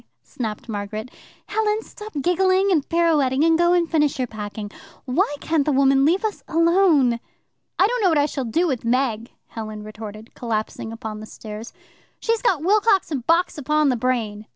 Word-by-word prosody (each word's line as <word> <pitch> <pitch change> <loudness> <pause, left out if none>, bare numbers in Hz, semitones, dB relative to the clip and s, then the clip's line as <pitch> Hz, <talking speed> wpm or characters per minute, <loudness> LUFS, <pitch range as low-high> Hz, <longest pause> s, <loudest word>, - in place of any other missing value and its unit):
snapped 220 -3 -6
Margaret. 215 +2 -5 0.3
"Helen, 430 0 0
stop 425 0 -10
giggling 375 +2 +3
and 310 -6 +1
pirouetting, 305 -5 +2
and 325 0 +4
go 345 +1 +3
and 345 -1 +2
finish 300 -3 +1
your 255 - 0
packing. 210 -2 -7 0.3
Why 290 +4 +1
can't 315 -1 +1
the 300 - 0
woman 270 0 +4
leave 365 +8 +2
us 430 - -3
alone?" 330 -7 +3 0.6
"I 380 - +5
don't 485 +3 0
know 380 - +4
what 320 - +2
I 290 - +4
shall 275 -3 -3
do 280 +11 +1
with 265 -8 -1
Meg," 235 -1 0 0.2
Helen 215 -2 -7
retorted, 215 +1 -9
collapsing 225 -1 -3
upon 220 -2 -6
the 215 - -9
stairs. 215 +2 -9 0.5
"She's 455 -1 0
got 370 -12 +1
Wilcox 400 -1 +3
and 260 -5 -3
Box 335 -1 +2
upon 300 +1 +2
the 255 - +2
brain. 220 -4 -2
280 Hz, 175 wpm, -22 LUFS, 225-345 Hz, 0.6 s, I